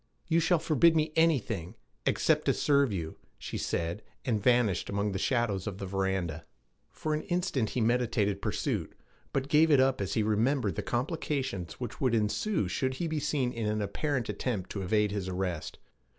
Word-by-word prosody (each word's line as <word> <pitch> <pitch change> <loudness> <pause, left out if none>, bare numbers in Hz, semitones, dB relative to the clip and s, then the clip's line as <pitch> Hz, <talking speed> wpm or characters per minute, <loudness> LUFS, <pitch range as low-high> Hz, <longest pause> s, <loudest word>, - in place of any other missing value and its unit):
'You 165 0 +3
shall 170 +2 +3
forbid 160 +1 +4
me 155 0 +1
anything 115 - +1 0.3
except - - +2
to - - +3
serve 140 -4 +3
you,' 85 -5 -4 0.2
she - - -5
said, 85 +5 -2 0.2
and 110 -5 0
vanished 115 -6 +2
among 100 +1 0
the 95 - -2
shadows 110 -5 0
of 100 -2 -4
the 100 - -5
veranda. 95 -4 -1 0.5
For 155 - -3
an 150 - 0
instant 175 - -1
he - - +2
meditated 110 -4 +1
pursuit, - - -2 0.4
but 135 0 -1
gave 155 +3 +5
it 145 -3 +6
up 130 -3 +3
as 95 - -2
he 110 - +2
remembered 115 +6 +1
the - - -3
complications 130 - -2
which 125 - -7
would 125 -4 +3
ensue 110 - 0
should 130 +8 -1
he 170 - -2
be 155 -1 -1
seen 145 -4 0
in 110 -2 -1
apparent 120 +5 -1
attempt 105 -2 -3
to 100 - -3
evade 105 +2 +1
his 100 -2 -3
arrest. 90 -3 -3
115 Hz, 180 wpm, -30 LUFS, 100-140 Hz, 0.5 s, it